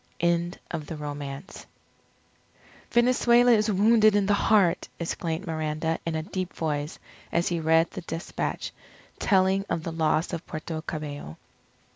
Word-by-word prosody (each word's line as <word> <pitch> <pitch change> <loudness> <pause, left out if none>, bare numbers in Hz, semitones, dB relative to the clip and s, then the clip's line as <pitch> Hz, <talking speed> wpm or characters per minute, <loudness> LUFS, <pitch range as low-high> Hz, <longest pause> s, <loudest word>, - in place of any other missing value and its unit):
END 170 +1 +1
OF 155 -3 -4
THE 160 - -5
ROMANCE 145 +2 -7 1.2
"Venezuela 240 0 +4
is 215 -1 +4
wounded 215 +2 +5
in 205 -1 +3
the 205 - +3
heart!" 200 -4 +3
exclaimed 165 +1 -3
Miranda 160 0 -2
in 165 - -1
a 160 - -2
deep 185 +1 -4
voice 150 -1 -2 0.3
as 170 - +1
he 170 -1 -1
read 160 +1 +3
the 185 - -6
despatch 165 0 -4 0.5
telling 190 -1 +3
of 160 - -1
the 165 - -3
loss 160 +1 +1
of 170 - -3
Puerto 155 0 -5
Cabello. 145 - -6
170 Hz, 140 wpm, -26 LUFS, 155-195 Hz, 1.2 s, wounded